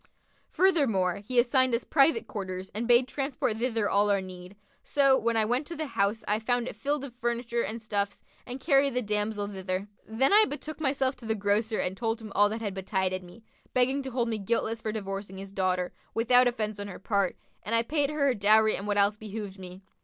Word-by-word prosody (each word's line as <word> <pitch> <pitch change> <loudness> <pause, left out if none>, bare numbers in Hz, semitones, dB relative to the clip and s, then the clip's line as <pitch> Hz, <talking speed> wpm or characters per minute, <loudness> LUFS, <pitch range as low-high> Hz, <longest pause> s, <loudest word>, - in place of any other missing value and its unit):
Furthermore, 250 - +2
he 230 +5 -5
assigned 250 +1 +4
us 235 - -2
private 320 +9 +3
quarters 190 -3 -6
and 230 +3 -3
bade 245 +1 +5
transport 270 -5 -2
thither 230 -3 0
all 205 +1 +2
our 200 -1 +3
need; 185 0 -9 0.3
so, 275 -2 +3
when 235 -3 0
I 220 - +3
went 250 +6 -1
to 340 - -6
the 315 - -3
house 210 -4 -1
I 210 +1 +2
found 245 +2 0
it - - -6
filled 280 +6 -2
full 280 - -5
of 240 - -24
furniture 235 0 -1
and 230 +1 -4
stuffs 205 -2 -2 0.2
and 250 +2 -7
carried 275 -2 +3
the 250 - 0
damsel 210 0 -1
thither. 190 0 -4 0.2
Then 250 - +2
I 430 +1 +7
betook 300 +1 -6
myself 270 -2 0
to 245 - -12
the 220 - +1
grocer 210 +2 0
and 180 - -1
told 225 +1 -2
him 220 -2 -9
all 205 0 +4
that 220 +2 -4
had 205 -3 -3
betided 190 -1 -1
me, 180 +5 -15 0.3
begging 260 +2 +2
to 265 - -5
hold 240 -2 -1
me 220 -2 -2
guiltless 225 +2 -1
for 215 - -2
divorcing 195 -2 -5
his 195 0 -8
daughter, 185 -2 0 0.2
without 245 +2 +5
offence 215 -4 -2
on 205 - -4
her 190 - -8
part; 200 -1 0 0.2
and 230 - -1
I 230 - +3
paid 290 +2 0
her 300 -2 0
her 270 - +3
dowry[FN#52] 215 0 +4
and 200 - -6
what 205 -1 0
else 200 +1 +3
behoved 210 -2 -7
me. 185 +1 -10
220 Hz, 220 wpm, -28 LUFS, 200-255 Hz, 0.3 s, I